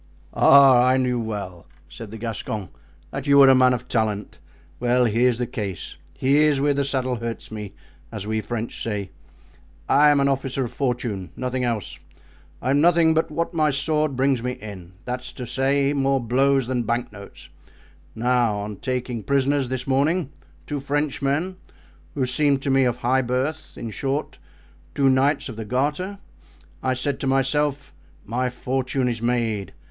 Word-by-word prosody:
"Ah, 135 -3 +7
I 130 +1 +4
knew 125 -2 0
well," 100 -6 -5 0.2
said 105 +7 -10
the 110 - -8
Gascon, 110 -3 -4 0.4
"that 135 +1 -5
you 140 0 +5
were 135 -1 +8
a - - +8
man 130 0 +5
of 125 0 -3
talent. 110 -4 -2 0.4
Well, 125 +1 +2
here's 120 +2 +2
the 125 - -1
case, 100 -7 -5 0.2
here's 145 +2 +3
where 145 +1 +2
the 140 0 0
saddle 130 -2 -1
hurts 115 -1 -6
me, 105 -2 -7 0.4
as 105 -3 -5
we 110 0 -1
French 115 0 -5
say. 100 -4 -3 0.8
I 150 +1 +5
am 145 -1 +4
an 140 - +3
officer 135 -1 -1
of 120 - -8
fortune, 120 - -2
nothing 130 0 -2
else; 115 -4 -3 0.6
I - - -1
have 140 - +3
nothing 165 +1 +4
but 160 +1 +1
what 165 +3 -2
my 155 -2 +2
sword 150 0 0
brings 130 -1 +1
me 125 +1 -2
in—that 100 +3 -8
is 125 - -8
to 125 - -6
say, 135 +3 +1
more 135 -1 +1
blows 135 +3 +2
than 125 0 -1
banknotes. 115 -3 -5 0.7
Now, 120 -1 +2
on 105 0 -5
taking 125 -1 -3
prisoners, 140 +1 +1
this 130 -1 -3
morning, 145 +4 +1 0.3
two 145 -1 -3
Frenchmen, 145 +4 -1 0.6
who 135 - +1
seemed 140 +1 +1
to 140 - 0
me 135 0 +4
of 120 -1 0
high 130 +2 +2
birth—in 130 -1 -3
short, 135 - -3 0.6
two 135 -1 +3
knights 140 +3 +2
of 120 -5 -8
the 110 - -5
Garter—I 130 - -4
said 135 +2 -1
to 135 - -2
myself, 140 +1 0 0.3
my 125 +4 -1
fortune 130 +1 -2
is 115 -2 -2
made. 115 -6 -1
130 Hz, 165 wpm, -23 LUFS, 115-140 Hz, 0.8 s, were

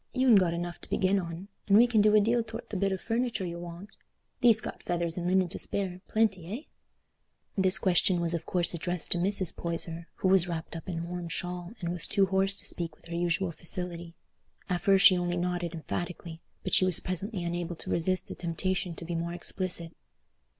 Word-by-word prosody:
You'n 255 -2 +5
got 180 -5 +4
enough 175 0 -5
to - - -12
begin 195 +1 +2
on, 170 +1 -6 0.2
and 200 0 +6
we 235 - +8
can 235 -3 +3
do 210 0 +5
a - - +8
deal 230 +3 +2
tow'rt 225 +1 -8
the - - -4
bit 195 +1 +1
o' 190 - -1
furniture 230 -2 -1
you'll 170 0 -5
want. 175 +3 -9 0.5
Thee'st 230 -3 +6
got - - -6
feathers 170 -1 -1
and 175 -1 -3
linen 185 0 +3
to - - -5
spare—plenty, 190 -1 0 0.2
eh?" - - -42 0.8
This 190 -1 +3
question 185 -1 +2
was 170 0 0
of 170 - -3
course 175 -1 +2
addressed 175 0 -3
to 175 - +2
Mrs. 190 -1 +1
Poyser, 170 0 -3
who - - -1
was 185 -2 +5
wrapped 165 -1 -5
up 165 +3 -7
in 175 - -3
a 165 - -3
warm 175 0 -5
shawl 175 +2 -5
and 170 -2 -3
was 170 -2 +3
too 200 -2 +3
hoarse 195 +1 +2
to - - 0
speak 165 -3 -3
with - - -26
her 170 - -4
usual 175 +1 0
facility. 170 0 -3 0.5
At 180 -1 -1
first 195 0 +4
she 185 -2 +8
only 175 0 -1
nodded 175 -1 -2
emphatically, 170 0 -5 0.2
but - - -4
she - - +7
was 185 -3 +3
presently 185 +1 -3
unable 175 0 -3
to - - -6
resist 185 +2 0
the - - -6
temptation 180 +1 -2
to 170 - -8
be 170 - -4
more 170 +1 -2
explicit. 175 -2 0
180 Hz, 215 wpm, -29 LUFS, 170-195 Hz, 0.8 s, we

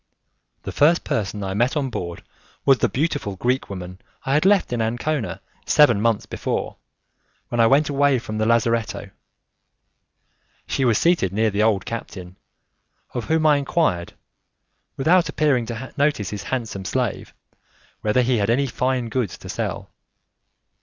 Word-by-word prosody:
The - - -5
first 165 +4 +3
person 105 -1 -2
I 95 0 -3
met 120 +8 +1
on 135 -3 -1
board 85 -5 -5 0.4
was 135 -2 +5
the - - +2
beautiful 145 -8 -2
Greek 125 +7 -1
woman 90 -1 -7 0.3
I 135 - 0
had 150 +4 +2
left 195 -10 +3
in 120 - 0
Ancona, 120 +4 -2 0.3
seven 120 -9 +5
months 115 -2 +1
before, - - -3 0.7
when 120 - -2
I 115 - +6
went 145 +4 +4
away 140 -1 +2
from 110 -2 -5
the 110 - +1
lazzaretto. 115 -1 0 1.5
She 135 - -1
was 115 -3 +3
seated 165 - +2
near 110 +2 +1
the 100 +1 0
old 105 -4 +2
captain, 95 -5 -7 0.8
of 120 - -3
whom 160 0 +1
I 150 -1 +5
enquired, 140 - 0 0.8
without 165 +4 +3
appearing 140 -7 +1
to 120 +2 -6
notice 145 -9 0
his 105 -1 -6
handsome 115 -7 -3
slave, - - -3 0.7
whether 110 +4 +2
he 125 0 +2
had 100 0 0
any 130 +4 +2
fine 130 -1 -1
goods 115 -4 -2
to - - -11
sell. - - -4
120 Hz, 155 wpm, -22 LUFS, 105-140 Hz, 1.5 s, I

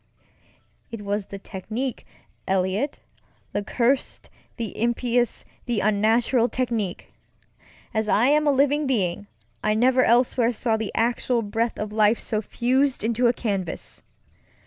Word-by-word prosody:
It 225 -3 -7
was 205 0 -2
the 200 - -7
technique, 220 +6 -5 0.4
EliotŌĆöthe 195 +2 -3
cursed, 255 +2 0 0.3
the 225 -5 -4
impious, 240 0 0 0.2
the 235 -3 0
unnatural 225 +4 +2
technique! 230 -7 -3 0.8
As 220 -1 0
I 220 +4 +4
am 300 +1 +3
a - - +6
living 285 +2 +2
being, 180 - -1 0.4
I 215 - +2
never 255 +3 +4
elsewhere 240 0 +3
saw 225 0 0
the 220 -1 -3
actual 235 +1 +1
breath 225 +3 -1
of 210 0 -4
life 215 +1 +3
so 215 -2 -1
fused 260 +4 0
into 235 +2 +2
a 235 - +3
canvas. 195 -8 -4
230 Hz, 125 wpm, -24 LUFS, 210-250 Hz, 0.8 s, a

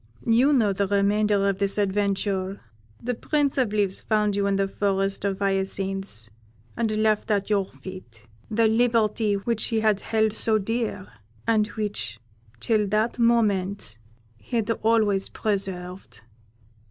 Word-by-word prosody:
You 240 +5 +4
know 225 -8 +3
the 200 +1 0
remainder 200 0 +2
of 195 -1 -1
this 200 0 0
adventure. 195 -1 -1 0.4
The 245 +1 -1
Prince 280 +3 0
of 245 -5 +1
Leaves 200 -2 0
found 210 -2 +1
you 200 0 +1
in 200 - +1
the 195 0 +1
forest 195 0 -1
of 195 -1 0
hyacinths, 195 - -1 0.5
and 230 -1 0
left 215 0 +1
at 205 0 0
your 200 -2 +2
feet 185 - -12 0.3
the 225 +1 +2
liberty 220 -2 +2
which 220 +2 -1
he 225 -1 0
had 215 -2 +2
held 220 -1 +1
so 220 0 +2
dear, 215 -2 -2 0.4
and 220 -2 +2
which, 205 - -4 0.4
till 215 - +1
that 215 +4 0
moment, 200 - +1 0.4
he 245 - -7
had 230 -1 +1
always 215 -3 +2
preserved. 190 -3 -4
205 Hz, 140 wpm, -25 LUFS, 195-220 Hz, 0.5 s, You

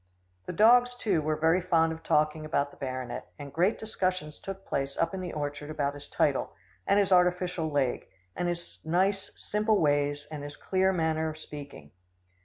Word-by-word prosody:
The - - -3
dogs, 245 +5 +5
too, 200 -9 +1
were 155 +1 0
very 165 +4 +3
fond 165 -2 +2
of 160 - -9
talking 155 -1 +1
about 145 -2 0
the - - -17
baronet, 130 -2 -5
and 140 -1 -9
great 180 +7 +2
discussions 185 -8 -2
took 195 0 -7
place 135 0 -2
up 165 +1 +1
in 190 - -3
the 180 -2 -4
orchard 145 0 -4
about 145 -2 -1
his 145 0 -10
title, 140 -3 0 0.3
and 200 - +4
his 200 -2 +2
artificial 180 -2 +3
leg, 140 -4 0 0.3
and 175 - -1
his 175 0 -4
nice 190 +4 +1
simple 215 +1 +1
ways, 145 -1 +1
and 150 -2 -5
his 145 0 -8
clear 190 0 +2
manner 160 -3 0
of 155 - -7
speaking. 140 - -10
160 Hz, 185 wpm, -29 LUFS, 145-185 Hz, 0.3 s, dogs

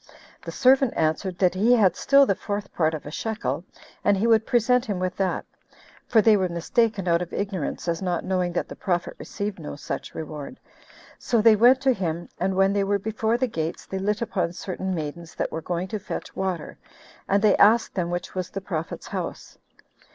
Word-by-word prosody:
The - - -7
servant 265 -1 +4
answered, 165 +4 0
that 180 -1 +3
he 215 +6 +3
had 195 -7 +4
still 275 0 +5
the 200 - +2
fourth 205 0 -5
part 160 -1 +1
of 155 - -8
a 145 - -7
shekel, 220 -2 -3 0.4
and 205 -1 +3
he 205 - 0
would 225 -1 +4
present 250 0 +3
him 205 -4 -2
with 185 0 -2
that; 190 -3 -1 0.6
for 220 -3 +4
they 220 0 +6
were 190 -2 +1
mistaken 195 +3 0
out 170 0 +3
of 175 - -5
ignorance, 195 -5 -3
as 170 +1 -1
not 180 -3 -1
knowing 185 -2 0
that - - -1
the - - -9
prophet 175 -3 -2
received 205 -3 -5
no 150 - -6
such 145 - -6
reward 155 - -7 0.6
6 - - -17
So 235 - +3
they 220 0 +6
went 245 +5 +5
to 265 -1 +3
him; 175 -5 -3
and 190 +1 0
when 195 +1 +3
they 200 -1 +1
were 200 +1 +1
before 220 +3 -1
the 255 - +1
gates, 165 -8 -4
they 190 - -4
lit 210 +3 0
upon 185 -6 -2
certain 190 +1 -4
maidens 160 +1 -6
that - - -2
were 160 - -4
going 175 +2 -3
to 215 - -3
fetch 195 - -6
water, 185 -4 -3 0.5
and 200 +2 +2
they 215 - +5
asked 225 +3 +5
them 175 -3 -1
which 175 0 -4
was 185 -2 -3
the 195 - -5
prophet's 170 -4 -5
house. - - -6
190 Hz, 210 wpm, -25 LUFS, 175-220 Hz, 0.6 s, they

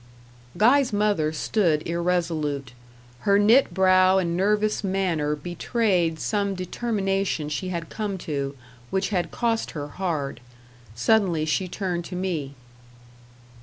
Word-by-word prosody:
Guy's 250 +6 +4
mother 205 -7 +1
stood 160 -1 0
irresolute. 165 -6 -1 0.5
Her 200 +8 +3
knit 220 +5 +5
brow 185 +1 +4
and 170 -3 0
nervous 210 +3 +1
manner 180 -6 0
betrayed 175 0 0
some 200 -2 -1
determination 195 -4 -1
she 185 +5 -3
had 170 -2 -5
come 210 -3 -3
to, 140 -2 -3 0.3
which 190 0 0
had 180 -4 -1
cost 230 -2 -1
her 145 0 -5
hard: 150 -7 -3 0.6
suddenly 170 - +2
she 185 +4 0
turned 180 -2 -3
to 180 - -7
me. 165 -7 -3
185 Hz, 120 wpm, -24 LUFS, 160-200 Hz, 0.6 s, knit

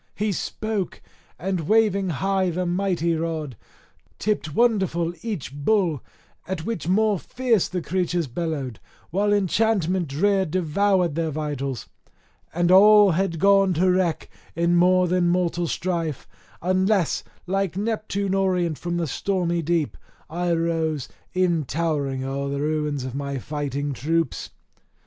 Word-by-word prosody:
He 210 +1 0
spoke, 210 0 -3 0.4
and 180 -4 -2
waving 210 -3 +3
high 190 +3 0
the 180 +2 -2
mighty 175 -2 0
rod, 160 -5 -3 0.6
tipped 185 -8 -2
wonderful 190 -8 +2
each 200 - -4
bull, 165 - +1 0.5
at 175 -4 -4
which 200 -9 -3
more 210 +1 +2
fierce 240 -3 +1
the 180 -2 -4
creatures 175 -1 0
bellowed, 140 - -4 0.3
while 205 +4 +1
enchantment 190 -3 +1
drear 190 +8 +2
devoured 185 +1 +1
their 165 +1 -1
vitals. 140 -4 -4 0.6
And 175 +1 +1
all 205 +1 +8
had 170 0 0
gone 195 +1 +4
to 185 +3 +3
wreck 180 -3 0 0.3
in 170 +1 +2
more 180 +1 +4
than 175 0 +2
mortal 175 -1 0
strife, 165 -5 -2 0.4
unless, 185 0 +1 0.2
like 190 0 -1
Neptune 200 -2 -1
orient 180 -5 +1
from 175 0 -2
the 170 - 0
stormy 175 +1 -1
deep, 165 -2 0 0.4
I 175 +1 -1
rose, 165 -4 -1 0.3
e'en 175 -4 +2
towering 140 -3 -1
o'er 140 +1 -3
the 140 0 -2
ruins 150 -2 -1
of 130 -1 -5
my 140 0 -3
fighting 145 +1 -3
troops. 160 +2 -1
175 Hz, 130 wpm, -24 LUFS, 155-195 Hz, 0.6 s, all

